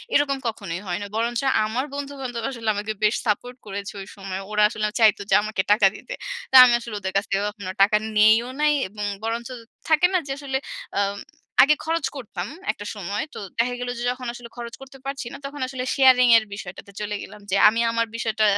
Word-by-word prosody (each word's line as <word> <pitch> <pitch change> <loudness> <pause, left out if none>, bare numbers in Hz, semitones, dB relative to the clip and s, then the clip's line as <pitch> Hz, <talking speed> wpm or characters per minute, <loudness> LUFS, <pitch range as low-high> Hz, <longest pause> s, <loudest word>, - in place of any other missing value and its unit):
এরকম 280 -1 +3
কখনোই 195 -5 -4
হয় 175 - -1
না। - - -4
বরঞ্চ 235 +1 0 0.2
আমার 240 +6 -2
বন্ধু-বান্ধব 270 -4 -5
আসলে 230 -4 -3
আমাকে 210 +1 -3
বেশ 210 +2 +4
সাপোর্ট 245 +4 -1
করেছে 200 0 -6
ঐ - - -6
সময়। 195 -1 -5
ওরা 210 0 +3
আসলে 215 -1 -2
আ 210 - -13
চাইতো 215 -2 +5
যে - - +5
আমাকে 215 -3 -1
টাকা 210 -2 +6
দিতে। - - -8 0.4
তো - - +2
আমি 240 - +4
আসলে 230 -3 -7
ওদের 190 -1 -4
কাছ 200 - +3
থেকে 195 0 +1
কখনো 200 -3 -7
টাকা 210 +1 +4 0.2
নেইও 220 +3 +5
নাই 300 0 +4 0.2
এবং 210 +1 -5 0.2
বরঞ্চ 230 +2 -3 0.4
থাকে 315 +2 +5
না - - +5
যে 270 - -4
আসলে 270 -2 -2 0.4
আম 200 0 0 0.5
আগে 300 +2 +5
খরচ 325 -1 0
করতাম 205 -8 -5 0.2
একটা 205 - -10
সময়। 200 +1 -3
তো - - -7 0.2
দেখা 245 +2 +1
গেলো 245 0 -3
যে - - -4
যখন 250 0 -6
আসলে 240 -1 -10
খরচ 235 -1 -6
করতে 270 0 -12
পারছি 275 -2 -4
না - - -7
তখন 285 0 -7
আসলে 255 -1 -4
sharing 255 -3 +6
এর 220 - 0
বিষয়টাতে 200 0 -9
চলে 210 0 -3
গেলাম 210 +1 -10
যে, - - +3
"আমি 225 - -2
আমার 230 0 +1
বিষয়টা 220 -1 0
225 Hz, 210 wpm, -23 LUFS, 205-255 Hz, 0.5 s, টাকা